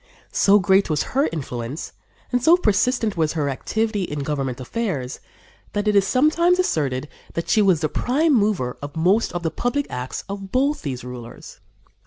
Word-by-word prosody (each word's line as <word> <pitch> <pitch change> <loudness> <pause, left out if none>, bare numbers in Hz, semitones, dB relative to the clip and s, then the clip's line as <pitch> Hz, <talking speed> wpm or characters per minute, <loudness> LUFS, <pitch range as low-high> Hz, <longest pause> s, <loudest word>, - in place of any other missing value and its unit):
So 200 +1 +5
great 195 -1 +3
was 150 -2 +1
her 275 +3 +2
influence 130 -2 -5 0.4
and 245 -1 +1
so 330 +7 +6
persistent 220 - +1
was 160 -3 +1
her 150 -3 -1
activity 220 - -1
in 150 -5 -3
government 135 -3 -2
affairs, 140 - -3 0.5
that 205 0 -1
it 210 - +3
is 200 -1 +4
sometimes 325 - +3
asserted 145 - 0 0.3
that 170 - -3
she 220 - +4
was 185 -6 +3
the 155 - +2
prime 295 - +1
mover 205 - +1
of 145 0 -7
most 185 +8 +2
of 175 -1 -4
the 165 - 0
public 275 +4 -1
acts 125 +1 -4
of 195 -1 -7
both 280 +4 +1
these 130 -6 -4
rulers. 125 -2 -9
195 Hz, 175 wpm, -22 LUFS, 145-230 Hz, 0.5 s, so